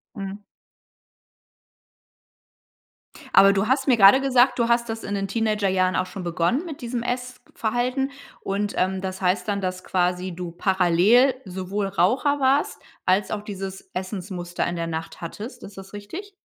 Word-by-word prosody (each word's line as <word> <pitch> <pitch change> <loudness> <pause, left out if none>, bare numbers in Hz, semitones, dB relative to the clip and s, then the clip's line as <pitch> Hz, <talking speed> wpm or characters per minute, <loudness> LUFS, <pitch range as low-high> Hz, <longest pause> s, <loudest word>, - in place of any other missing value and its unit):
Mhm. 200 0 -6 2.9
Aber 195 0 +8
du 200 +1 0
hast 265 +3 +1
mir 250 -3 +5
gerade 200 +6 +8
gesagt, 255 -1 +3
du 235 - +3
hast 235 0 +2
das 225 0 -4
in 205 - -3
den 195 0 -2
Teenagerjahren 200 -4 +1
auch 185 - +1
schon 190 0 -8
begonnen 175 - 0
mit 310 -5 -8
diesem 240 0 -3
Essverhalten. 250 +1 -2 0.3
Und, 200 +1 -2
ähm, 190 +1 0
das 190 0 -5
heißt 185 +4 +1
dann, 205 -1 0
dass 185 -1 -3
quasi 180 0 -1
du 175 -1 -5
parallel 190 +8 +4
sowohl 190 +1 -3
Raucher 250 - +1
warst 270 +2 +2 0.3
als 190 +2 +2
auch 210 - -2
dieses 195 -2 -7
Essensmuster 185 -2 -4
in 175 - -3
der 170 -1 -2
Nacht 160 0 -5
hattest. 215 +9 -8
Ist 195 - -11
das 195 +1 -12
richtig? 335 - -8
200 Hz, 155 wpm, -24 LUFS, 185-240 Hz, 2.9 s, Aber